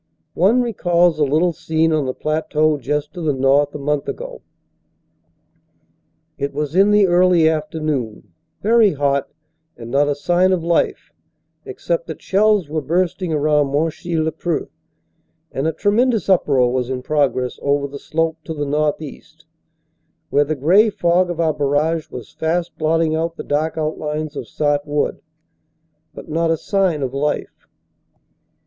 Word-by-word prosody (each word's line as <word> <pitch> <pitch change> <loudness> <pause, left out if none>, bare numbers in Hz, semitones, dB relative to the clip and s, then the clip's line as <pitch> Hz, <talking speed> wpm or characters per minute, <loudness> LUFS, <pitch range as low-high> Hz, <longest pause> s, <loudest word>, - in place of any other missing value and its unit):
One 220 +9 +3
recalls 175 -7 +1
a - - +4
little 155 +5 +2
scene 160 +1 0
on 150 -4 0
the 130 - -2
plateau 155 -1 0
just 145 +3 -3
to 175 - -7
the 150 -4 0
north 140 +2 +2
a - - -2
month 145 0 -2
ago. - - -6 2.0
It 140 0 -3
was 150 0 -2
in 195 +2 +5
the 210 -1 +5
early 175 -2 +4
afternoon, 150 - -3 0.3
very 220 -1 +4
hot 140 -1 0 0.5
and 120 0 -9
not 140 +2 +3
a 145 - 0
sign 175 +5 +2
of 175 -3 -1
life, 170 0 0 0.5
except - - -3
that - - -7
shells 205 -3 +2
were 155 +1 -2
bursting 175 +2 -1
around 150 -1 +2
Monchy 165 +3 -1
le 160 0 0
Preux 165 0 -3 0.8
and 135 +4 -2
a - - +1
tremendous 220 +7 +1
uproar 135 -9 +3
was 125 -1 -1
in 130 -1 -4
progress 135 -4 0
over 140 0 0
the 140 0 -9
slope 165 0 -2
to 160 - -5
the 145 -1 -2
northeast, 150 +1 -3 0.9
where 145 +1 +3
the 155 +2 -2
gray 185 - +4
fog 175 -2 +1
of 175 -1 -4
our 160 -2 +2
barrage 150 +3 0
was 125 -4 -9
fast 170 +2 -2
blotting 160 0 +1
out 165 +1 -2
the - - -6
dark 155 +3 -1
outlines 155 -1 -3
of - - -6
Sart 145 -1 0
Wood, 145 0 -1 0.9
But - - -10
not 165 +1 0
a 165 - +2
sign 185 -5 0
of 130 -1 -3
life. 145 +2 -3
155 Hz, 155 wpm, -19 LUFS, 145-175 Hz, 2.0 s, in